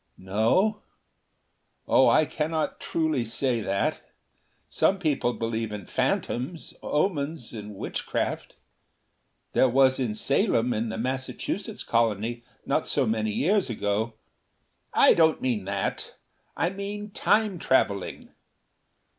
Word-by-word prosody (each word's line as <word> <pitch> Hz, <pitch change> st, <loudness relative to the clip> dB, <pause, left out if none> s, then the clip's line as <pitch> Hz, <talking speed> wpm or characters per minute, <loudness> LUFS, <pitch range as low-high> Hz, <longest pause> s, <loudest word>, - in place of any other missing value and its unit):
"No. 110 Hz, -, +1 dB, 1.1 s
Oh, -, -, +5 dB
I -, -, +5 dB
cannot 155 Hz, 0 st, -2 dB
truly 155 Hz, -6 st, 0 dB
say 120 Hz, +1 st, 0 dB
that. 100 Hz, -1 st, -1 dB, 0.7 s
Some 195 Hz, -, +2 dB
people 150 Hz, -8 st, 0 dB
believe 115 Hz, -1 st, -3 dB
in 105 Hz, -3 st, -6 dB
phantoms, 145 Hz, +8 st, -2 dB
omens 150 Hz, -, -1 dB
and 105 Hz, -2 st, -7 dB
witchcraft. -, -, -3 dB, 1.0 s
There 130 Hz, -, +4 dB
was 130 Hz, +1 st, +4 dB
in 115 Hz, -5 st, -1 dB
Salem, 125 Hz, -, +1 dB
in 110 Hz, +1 st, -1 dB
the 110 Hz, -, -4 dB
Massachusetts 130 Hz, +3 st, -3 dB
Colony, 115 Hz, +1 st, 0 dB, 0.2 s
not -, -, 0 dB
so -, -, +2 dB
many 110 Hz, 0 st, 0 dB
years 185 Hz, -, +1 dB
ago 110 Hz, +1 st, -1 dB, 0.4 s
" -, -, -46 dB
"I -, -, +6 dB
don't 160 Hz, -2 st, +4 dB
mean 115 Hz, -7 st, -1 dB
that. 100 Hz, 0 st, -3 dB, 0.4 s
I 170 Hz, -, +1 dB
mean 205 Hz, +1 st, -6 dB
Time 210 Hz, -3 st, +2 dB
traveling." 100 Hz, -10 st, 0 dB
125 Hz, 115 wpm, -26 LUFS, 110-160 Hz, 1.1 s, I